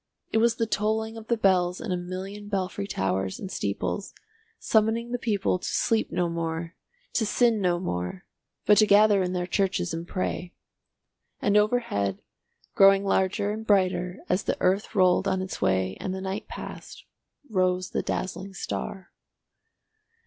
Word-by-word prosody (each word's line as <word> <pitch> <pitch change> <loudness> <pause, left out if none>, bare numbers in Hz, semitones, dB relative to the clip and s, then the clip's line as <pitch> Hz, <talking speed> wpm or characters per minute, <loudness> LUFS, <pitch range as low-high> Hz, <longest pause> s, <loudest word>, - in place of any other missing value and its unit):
It 220 - +3
was 235 +1 +3
the 230 - 0
tolling 220 +1 -1
of 225 -1 -9
the 235 - +1
bells 180 -3 +2
in 225 - -4
a - - +1
million 190 +3 -6
belfry 195 0 -2
towers 95 - -1
and 190 - -6
steeples, 100 - -3 0.4
summoning 225 +2 +1
the 245 - -1
people 205 -5 0
to - - -5
sleep 225 -2 +1
no 175 - +1
more, 165 0 -3 0.4
to 235 - +1
sin 225 0 +2
no 175 -2 +2
more, 130 - -4 0.4
but 210 - +6
to 215 - +5
gather 205 -1 +6
in 180 0 -1
their 180 -1 -1
churches 185 -2 0
and 165 +1 -5
pray. 180 -1 -3 0.8
And 205 - +1
overhead, 210 - +1 0.5
growing 195 0 +6
larger 195 +1 +1
and 220 +1 -4
brighter 185 -3 +1
as 180 +2 +1
the - - 0
earth 195 +4 +1
rolled 185 -2 +4
on 190 - +1
its 185 0 -5
way 95 0 +1
and 190 - -3
the 190 - -5
night 190 +2 -4
passed, - - -9 0.4
rose 185 -3 0
the - - 0
dazzling 190 +1 -4
star. 190 0 -5
190 Hz, 160 wpm, -26 LUFS, 180-210 Hz, 0.8 s, but